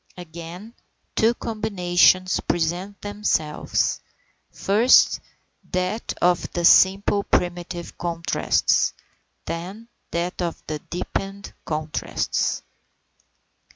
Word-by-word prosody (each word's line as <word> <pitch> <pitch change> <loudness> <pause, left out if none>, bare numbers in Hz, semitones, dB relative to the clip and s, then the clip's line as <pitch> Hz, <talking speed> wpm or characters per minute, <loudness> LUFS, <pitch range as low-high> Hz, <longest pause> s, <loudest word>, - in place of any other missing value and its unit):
Again, 175 +5 -9 0.4
two 230 +2 +3
combinations 185 -5 +2
present 175 +4 -2
themselves; 205 -7 0 0.5
first 220 +6 +4 0.5
that 185 +5 -2
of 175 0 +2
the 175 -1 0
simple 195 +3 +5
primitive 175 -1 -2
contrasts, 170 -1 +1 0.5
then 195 +7 -6 0.2
that 175 +2 -2
of 170 -2 -3
the 155 -1 -4
deepened 195 +5 -5
contrasts. 155 0 -2
180 Hz, 80 wpm, -23 LUFS, 170-200 Hz, 0.5 s, simple